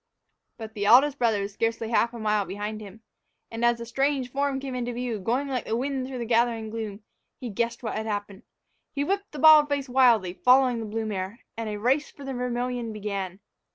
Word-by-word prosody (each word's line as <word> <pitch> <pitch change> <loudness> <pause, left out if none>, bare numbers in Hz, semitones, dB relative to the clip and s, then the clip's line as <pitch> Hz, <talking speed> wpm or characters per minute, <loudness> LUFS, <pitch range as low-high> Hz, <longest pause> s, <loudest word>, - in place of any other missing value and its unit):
But 220 -1 -8
the 205 -2 -2
eldest 270 +5 +6
brother 220 -4 +2
was 200 0 -6
scarcely 225 +1 -2
a - - +1
half 235 - +3
mile 215 -3 0
behind 205 +3 -5
him. 210 +1 -11 0.5
And, 225 +1 -4
as 240 0 +4
the 235 - -7
strange 270 +1 -1
form 280 0 -1
came 270 -1 -6
into 245 -1 -3
view, 240 -2 -3
going 245 +8 -1
like 255 -4 -2
the 225 - -1
wind 265 0 -2
through 260 -1 -6
the 240 - -3
gathering 230 -1 +1
gloom, 215 -2 -6 0.4
he 245 -3 -5
guessed 235 +4 -2
what 220 - -3
had 220 0 -3
happened. 205 -1 -4 0.5
He 285 - -1
whipped 400 +5 -2
the 300 - -8
bald 305 0 +7
face 285 -1 -1
wildly, 240 -8 +4
following 250 +2 +4
the 225 - -5
blue 220 +1 -3
mare. 200 +2 -4
And 225 -1 -4
a 210 - -4
race 260 +7 +1
for 285 - -13
the 270 - -4
Vermillion 245 -1 -2
began! 200 -3 -5
235 Hz, 215 wpm, -26 LUFS, 215-260 Hz, 0.5 s, bald